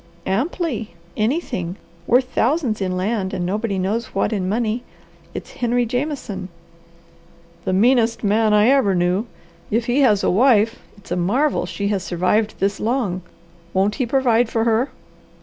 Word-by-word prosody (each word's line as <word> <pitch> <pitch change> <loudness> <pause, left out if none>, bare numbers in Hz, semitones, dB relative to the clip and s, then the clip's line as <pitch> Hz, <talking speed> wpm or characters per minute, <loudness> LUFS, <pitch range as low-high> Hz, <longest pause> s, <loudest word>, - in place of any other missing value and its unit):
"Amply. 230 - -2 0.2
Anything! 215 - -1 0.3
Worth 250 +2 +5
thousands 250 -4 0
in 185 -1 -1
land 195 0 -1
and 175 - -2
nobody 205 +2 -1
knows 205 +5 -2
what 195 - +1
in 185 -3 -1
money. 225 +2 0 0.5
It's - - -6
Henry 245 0 0
Jameson." 240 -7 -3 1.2
"The 190 - 0
meanest 230 +3 +3
man 215 +1 +3
I 210 +2 +5
ever 260 -9 +3
knew. 180 +5 +1 0.4
If 230 +2 0
he 245 +4 +1
has 210 -7 +4
a - - +3
wife 225 +1 +3 0.2
it's 200 - -17
a - - +1
marvel 200 +4 +1
she 200 +2 -2
has 200 -2 0
survived 185 +5 0
this 195 +1 0
long. 220 -6 -1 0.5
Won't 195 +2 +2
he 250 - 0
provide 245 -2 +2
for 225 -1 0
her?" 230 +3 +2
220 Hz, 150 wpm, -21 LUFS, 195-245 Hz, 1.2 s, Worth